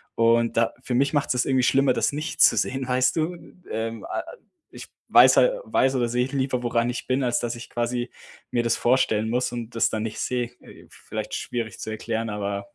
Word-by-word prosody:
Und 115 0 +2
da 115 0 +2
für 125 - -2
mich 140 +4 +2
macht's 145 -3 +1
das 125 - 0
irgendwie 130 -1 +2
schlimmer, 135 +2 +3
das - - 0
nicht 150 +3 -3
zu - - +6
sehen, 130 -1 -1
weißt 125 0 +2
du? 165 +2 -1 0.4
Ähm, 115 0 -4
a - - -3
a - - -12 0.4
ich - - -10 0.2
weiß - - +7
hal - - +3
weiß 135 0 +2
oder 120 -2 +1
sehe 125 +1 +1
lieber, 130 -2 -2
woran 120 0 +1
ich 125 - -4
bin, 130 +1 +1
als 120 -1 +1
dass 120 0 -3
ich 120 - -10
quasi 120 +1 -2 0.4
mir 120 - +1
das 115 0 +1
vorstellen 110 -3 +2
muss 125 +1 0
und 120 -1 -6
das 115 - +2
dann 110 - -2
nicht 110 -1 -5
sehe. 125 -1 -1 0.2
Äh, - - -15
vielleicht - - -6
schwierig 115 -5 -4
zu 110 - -5
erklären, 115 +1 -3
aber 100 -1 -4
120 Hz, 215 wpm, -24 LUFS, 115-130 Hz, 0.4 s, weiß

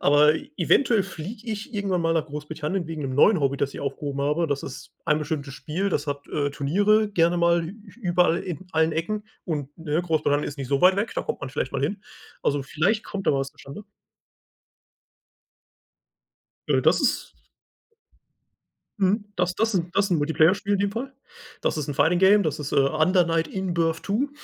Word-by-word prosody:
Aber 145 +2 +5 0.2
eventuell 235 -6 +3
fliege 195 +6 -8
ich 220 +4 -5
irgendwann 195 -3 0
mal 165 0 +2
nach 155 -1 0
Großbritannien 150 +4 -4
wegen 160 -2 -5
'nem 130 -2 -3
neuen 185 +5 +5
Hobby, 140 0 +1
das 140 0 -1
ich - - -6
aufgehoben 140 0 -4
habe. 150 +4 +1
Das 140 -1 -2
ist 130 - -9
ein 150 - +2
bestimmtes 145 -3 -4
Spiel, 160 +9 -2
das 150 -5 -1
hat, 140 -1 -4
äh, 145 -1 -1
Turniere 205 +10 +2
gerne 170 -3 +2
mal 170 0 +3
ü 190 - -8 0.3
überall, 175 -3 +2
in 180 0 -6
allen 160 0 +2
Ecken 210 +7 -2 0.2
und, 145 -4 -4
ne, 160 0 -1
Großbritannien 155 -4 +1
ist 145 - -9
nicht 135 -2 -5
so 140 0 +1
weit 185 +1 +6
weg, 205 +4 -1
da - - -1
kommt - - -4
man - - -5
vielleicht 135 -1 -3
mal 135 -1 -2
hin. 190 +8 -2 0.4
Also, 145 -1 +1
vielleicht 180 +11 0
kommt 195 -1 -6
da - - +5
was 135 0 -1
zustande. 145 +10 -11 2.8
Äh, - - +3
das - - +3
ist - - 0 1.7
Mhm, 200 +2 +2
das 180 0 0
das 225 0 +1
'n 175 -1 -1
das 200 0 +2
'n 175 - +2
Multiplayer-Spiel 160 +6 +2
in 195 - +1
dem 200 0 +1
Fall. 255 +5 -5 0.5
Das - - 0
ist 150 -2 -3
'n - - -2
Fighting 160 +6 +3
Game, 200 +2 +6
das 155 -3 -2
ist, 145 - -5
äh, - - 0
„Under 155 +6 +3
Knight 165 -1 0
In 190 -1 -3
Birth 165 -1 0
2“. 230 +8 0
165 Hz, 190 wpm, -25 LUFS, 145-195 Hz, 2.8 s, weit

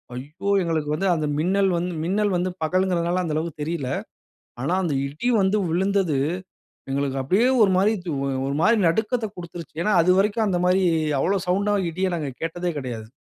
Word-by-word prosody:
ஐயோ! 155 +10 -6
எங்களுக்கு 160 -3 -1
வந்து 195 +5 -1
அந்த 155 - -1
மின்னல் 190 +4 +2
வந்து 175 +1 -2
மின்னல் 200 +3 +1
வந்து 180 +1 -1
பகல்ங்குறதனால, 180 +1 +1
அந்த 160 -3 -2
அளவுக்கு 160 -1 -3
தெரியல. 150 -5 -3 0.7
ஆனா 150 - 0
அந்த 160 -5 0
இடி 150 - -3
வந்து 190 +2 +2
விழுந்தது, 185 -2 +1 0.7
எங்களுக்கு 135 0 -1
அப்டியே 195 - +3
ஒரு 200 - +5
மாரி 200 +4 +3 0.5
ஒரு 140 - -2
மாரி 225 +3 +5
நடுக்கத்த 220 +6 0
குடுத்துருச்சு. 170 -2 -9
ஏன்னா 210 - +1
அதுவரைக்கும் 200 +5 +2
அந்த 180 -3 +1
மாரி 185 +1 +3 0.4
அவ்வளோ 195 +7 +1
சவுண்டா 200 +3 +1 0.2
இடிய 185 +3 -1
நாங்க 150 -4 -3
கேட்டதே 175 +2 -2
கிடையாது. 115 -5 -6
180 Hz, 160 wpm, -23 LUFS, 155-195 Hz, 0.7 s, ஒரு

